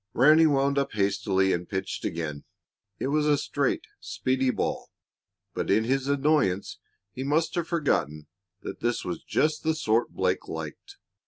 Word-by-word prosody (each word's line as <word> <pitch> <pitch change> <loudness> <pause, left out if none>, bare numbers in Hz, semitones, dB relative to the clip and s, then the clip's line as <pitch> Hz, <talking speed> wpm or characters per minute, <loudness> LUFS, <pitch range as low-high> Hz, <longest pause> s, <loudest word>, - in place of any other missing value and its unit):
Ranny 155 +6 +6
wound 140 -1 +2
up 140 - -2
hastily 100 -2 +1
and 85 0 -3
pitched 95 -1 -3
again. 80 -3 -4 0.5
It 130 - -2
was 150 +1 +1
a 145 -1 +4
straight, 145 -1 -1
speedy 130 0 -1
ball, - - -2 0.6
but - - -3
in 110 +3 +4
his 135 +3 0
annoyance 140 -9 +1 0.3
he 130 - -5
must 155 +4 +1
have 170 -2 -1
forgotten 75 - 0 0.4
that - - -6
this 120 0 -1
was 170 -1 -4
just 155 0 0
the 160 0 0
sort 115 -7 +1
Blake - - -1
liked. 400 0 -7
135 Hz, 155 wpm, -27 LUFS, 100-150 Hz, 0.6 s, Ranny